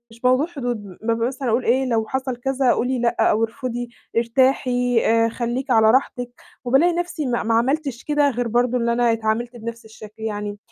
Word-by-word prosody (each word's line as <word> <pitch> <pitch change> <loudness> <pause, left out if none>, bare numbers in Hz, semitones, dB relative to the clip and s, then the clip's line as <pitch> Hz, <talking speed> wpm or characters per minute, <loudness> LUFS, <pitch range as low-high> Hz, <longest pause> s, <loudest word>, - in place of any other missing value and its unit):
مش 230 +2 -18
موضوع 255 +5 +3
حدود 245 -10 -4 0.2
م 230 +1 0
مثلًا 260 -1 -3
أقول 230 +3 +1
إيه 260 +3 +2
لو 225 -3 0
حصل 265 -1 -2
كذا 265 0 +1
قولي 250 +1 0
لأ 235 0 0
أو 220 +2 +2
ارفضي، 245 0 -4 0.3
ارتاحي 245 0 +2
آآ، 230 0 +3
خليكِ 245 +3 -3
على 220 -2 +5
راحتِك، 245 -1 0 0.3
وبالاقي 275 +8 +3
نفسي 345 -4 -3
ما 240 -1 0
ما 225 +1 0
عملتِش 270 +1 0
كده 295 -1 +2
غير 245 -1 -2
برضه 245 +2 +1
إن 235 - -1
أنا 235 0 +2
اتعامِلت 225 +2 -2
بنَفْس 230 0 -7
الشكل 220 0 -13
يعني، 205 -1 -4
240 Hz, 185 wpm, -21 LUFS, 230-260 Hz, 0.3 s, على